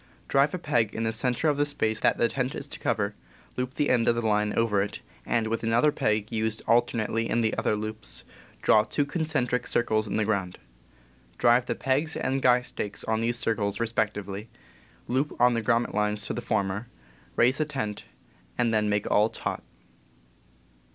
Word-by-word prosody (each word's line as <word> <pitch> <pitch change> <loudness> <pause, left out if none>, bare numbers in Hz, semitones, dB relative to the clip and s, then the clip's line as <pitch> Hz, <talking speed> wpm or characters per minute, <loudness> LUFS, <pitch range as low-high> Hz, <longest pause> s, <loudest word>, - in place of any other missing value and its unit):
Drive 140 +2 +3
a - - -2
peg 120 - 0
in 115 - -2
the 110 0 0
center 125 +6 0
of 145 -2 +2
the 145 - +3
space 110 -7 -1
that - - +2
the 120 - +3
tent 130 +1 -2
is - - -5
to - - -9
cover, - - 0 0.4
loop 125 +2 -3
the 150 - +1
end 120 -2 +2
of 120 - +4
the 120 -1 -2
line 105 -1 +2
over 110 -3 +2
it, 100 +1 -4 0.3
and, 115 -2 +1
with 115 +1 -2
another 120 +6 +3
peg 110 -4 0
used 110 -1 -1
alternately 115 -1 +1
in 115 - +1
the 110 -1 +1
other - - +1
loops, 110 -1 -4 0.4
draw 105 - +5
two 145 +6 -1
concentric 145 -5 -1
circles 110 -2 +1
on 100 - -3
the 110 - +1
ground. 95 -4 -1 0.8
Drive 120 +1 +4
the - - -1
pegs 145 +4 0
and 135 +1 -1
guy 125 -1 +4
stakes 105 -4 -5
on 110 0 0
these 120 +1 0
circles, 105 -4 -1
respectively, 105 -2 -2 0.6
loop 135 +4 -1
on 125 0 +5
the 115 - 0
grommet 115 +1 +1
lines 105 0 0
to - - -3
the - - -4
former, 100 +3 -1 0.5
raise 125 +4 +3
the 155 - +2
tent, 110 -9 -4 0.5
and 120 -2 +2
then 105 -1 +2
make 105 0 0
all 105 +2 +4
taut. 115 - -4
115 Hz, 190 wpm, -27 LUFS, 105-125 Hz, 0.8 s, draw